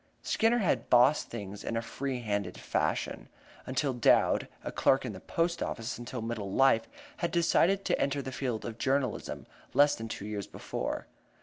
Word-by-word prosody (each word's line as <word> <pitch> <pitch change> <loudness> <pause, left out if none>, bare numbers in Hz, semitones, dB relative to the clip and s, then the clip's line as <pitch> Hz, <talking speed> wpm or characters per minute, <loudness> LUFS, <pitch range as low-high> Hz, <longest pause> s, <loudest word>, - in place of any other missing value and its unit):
Skinner 225 +2 +2
had 195 -8 0
"bossed" 125 +5 +5
things 100 -3 -7
in 115 - -2
a - - 0
free 130 +1 -3
handed 100 -5 -2
fashion - - -2 0.4
until 135 +1 0
Dowd 120 -2 +3 0.2
(a - - -4
clerk 135 0 +3
in 120 - -4
the 95 - -8
post 170 - -1
office 115 +2 -3
until 120 -1 -5
middle 110 -4 -4
life) 135 0 +4 0.3
had 170 -4 -1
decided 175 +3 +3
to - - +1
enter 140 0 0
the 130 - -5
field 125 -4 -3
of 115 -1 -6
journalism 130 -3 -1 0.3
less 145 0 +6
than 115 -4 -5
two 105 -2 -6
years 105 -2 -4
before. - - -4
125 Hz, 175 wpm, -30 LUFS, 110-145 Hz, 0.4 s, less